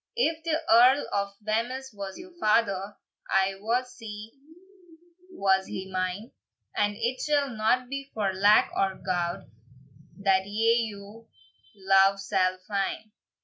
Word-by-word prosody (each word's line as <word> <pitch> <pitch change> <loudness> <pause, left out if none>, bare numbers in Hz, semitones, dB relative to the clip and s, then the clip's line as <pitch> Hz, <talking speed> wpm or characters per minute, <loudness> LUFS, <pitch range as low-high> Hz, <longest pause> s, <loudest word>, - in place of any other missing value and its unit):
"If 330 -10 0
the 320 -1 0
Earl 250 +5 +6
of 200 0 -1
Wemyss 240 +4 -2
was 195 -2 -7
your 360 0 -11
father, 205 - +1 0.3
I 195 0 +2
wot 240 +5 0
sae 220 -3 -9 1.0
was 190 - +1
he 190 0 -6
mine; 185 +5 -3 0.4
And 205 0 +1
it 240 +3 -2
shall 290 -3 +1
not 235 +3 +1
be 275 +1 -6
for 200 -3 -1
lack 205 +3 +4
o 190 -1 0
gowd 175 -2 -1 0.7
That 195 -1 +2
ye 225 +3 +2
your 205 +3 -12 0.5
love 195 0 +4
sall 185 -1 0
fyne. 200 +1 -3
210 Hz, 130 wpm, -27 LUFS, 195-240 Hz, 1.0 s, Earl